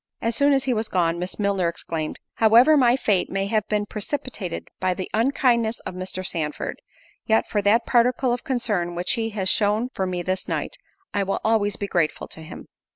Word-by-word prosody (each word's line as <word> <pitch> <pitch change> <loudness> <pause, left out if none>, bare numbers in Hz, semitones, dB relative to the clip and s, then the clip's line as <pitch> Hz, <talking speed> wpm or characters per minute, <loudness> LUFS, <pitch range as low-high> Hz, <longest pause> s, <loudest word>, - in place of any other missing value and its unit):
As 230 0 -1
soon 285 0 +4
as 270 -2 +3
he 265 -2 +1
was 220 -1 -1
gone, 170 -2 +1
Miss 180 +1 -4
Milner 200 -4 +1
exclaimed, 160 -2 -4 0.2
"However 235 +7 +6
my 250 -4 +5
fate 205 -8 +1
may 195 0 -1
have 215 +1 0
been 210 -1 0
precipitated 210 - -4
by 185 -1 0
the 185 - -6
unkindness 235 -1 +2
of - - -6
Mr. 185 0 -5
Sandford, 155 -4 -3 0.5
yet, 220 0 +3
for 205 - 0
that 220 +4 +3
particle 245 +1 +2
of 245 - -4
concern 215 - -1
which 175 +1 -1
he 225 -1 0
has 190 -1 0
shown 210 +5 +2
for 190 - -2
me 180 -1 -3
this 185 +1 -2
night, - - -3 0.4
I 205 - +1
will 195 0 -1
always 215 -2 +2
be 200 - -4
grateful 175 -5 -1
to 160 - -11
him." 160 - -10
205 Hz, 200 wpm, -23 LUFS, 185-235 Hz, 0.5 s, However